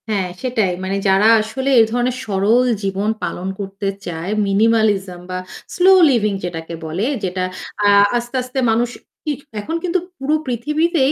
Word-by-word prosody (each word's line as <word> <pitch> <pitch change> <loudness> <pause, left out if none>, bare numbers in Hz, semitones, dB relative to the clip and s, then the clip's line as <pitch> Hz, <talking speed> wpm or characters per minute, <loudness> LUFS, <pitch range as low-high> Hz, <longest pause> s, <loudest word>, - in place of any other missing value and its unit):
হ্যাঁ 200 -4 0
সেটাই। 230 -7 0
মানে 190 +1 -2
যারা 195 +2 +4
আসলে 230 +5 -3
এ - - +9
ধরনের 245 +1 0
সরল 210 +4 +2 0.2
জীবন 195 +2 -1
পালন 180 - -3
করতে 195 0 -5 0.2
চায়, 170 +3 -4 0.2
minimalism 205 -3 +2
বা 185 - -3 0.4
স্লো 365 +1 +5 0.2
লিভিং 215 -6 +2
যেটাকে 165 -1 -5
বলে, 170 +7 -2 0.2
যেটা 185 0 -2 0.4
আ - - +6 0.3
আস্তে, 240 +2 -5
আস্তে 255 +1 -4
মানুষ 235 +2 +1 0.4
ই - - +1 0.3
এখন 320 +10 -4
কিন্তু 365 +1 +1 0.2
পুরো 280 +3 0
পৃথিবীতেই 295 +4 +1
215 Hz, 150 wpm, -19 LUFS, 190-255 Hz, 0.4 s, এ